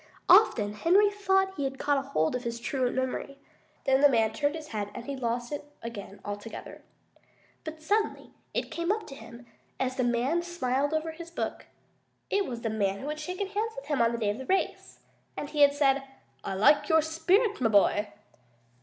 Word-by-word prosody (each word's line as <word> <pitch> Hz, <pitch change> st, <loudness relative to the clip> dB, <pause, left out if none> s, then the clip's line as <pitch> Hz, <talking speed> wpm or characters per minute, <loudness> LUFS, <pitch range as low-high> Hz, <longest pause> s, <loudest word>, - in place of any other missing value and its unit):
Often 245 Hz, -, +6 dB
Henry 380 Hz, -, +4 dB
thought 385 Hz, -1 st, +1 dB
he 285 Hz, -, -2 dB
had 270 Hz, 0 st, -2 dB
caught 285 Hz, -1 st, +1 dB
hold 250 Hz, -, 0 dB
of 250 Hz, -, -3 dB
his 235 Hz, 0 st, -4 dB
truant 255 Hz, 0 st, -1 dB
memory. 260 Hz, +2 st, -3 dB, 0.5 s
Then 265 Hz, 0 st, +3 dB
the 290 Hz, -, +8 dB
man 225 Hz, -4 st, +2 dB
turned 290 Hz, +1 st, 0 dB
his 310 Hz, -2 st, -8 dB
head 205 Hz, -2 st, -3 dB
and 235 Hz, -, -7 dB
he 280 Hz, -, -4 dB
lost 240 Hz, -1 st, -2 dB
it 290 Hz, -, -4 dB, 0.2 s
again 205 Hz, -3 st, -7 dB
altogether. 205 Hz, +2 st, -7 dB, 0.8 s
But 315 Hz, -1 st, -8 dB
suddenly 420 Hz, +6 st, 0 dB, 0.2 s
it -, -, -3 dB
came 340 Hz, +1 st, -3 dB
to 360 Hz, -, -11 dB
him, 240 Hz, -2 st, -12 dB, 0.3 s
as 260 Hz, 0 st, -1 dB
the 255 Hz, -, +1 dB
man 245 Hz, +8 st, +1 dB
smiled 290 Hz, -5 st, -1 dB
over 320 Hz, +1 st, -1 dB
his 335 Hz, +1 st, -9 dB
book 340 Hz, -, -4 dB, 0.6 s
it 400 Hz, -1 st, +1 dB
was 235 Hz, -2 st, -5 dB
the 225 Hz, -, -1 dB
man 200 Hz, -3 st, 0 dB
who 275 Hz, +7 st, -6 dB
had 305 Hz, 0 st, -4 dB
shaken 360 Hz, +6 st, -3 dB
hands 430 Hz, +3 st, -2 dB
with -, -, -8 dB
him 290 Hz, -5 st, 0 dB
on 230 Hz, 0 st, +4 dB
the 235 Hz, -, -2 dB
day 210 Hz, -3 st, 0 dB
of 210 Hz, -, -6 dB
the 265 Hz, -, -8 dB
race! 385 Hz, 0 st, -1 dB, 0.4 s
And 290 Hz, -, -5 dB
he 300 Hz, -, 0 dB
had 285 Hz, 0 st, +6 dB
said, 275 Hz, -1 st, +3 dB, 0.4 s
"I 195 Hz, -, -3 dB
like 220 Hz, -, +4 dB
your 320 Hz, -1 st, +5 dB
spirit, 370 Hz, -, +1 dB
my 225 Hz, -, +3 dB
boy." 205 Hz, 0 st, +3 dB
275 Hz, 200 wpm, -28 LUFS, 235-330 Hz, 0.8 s, the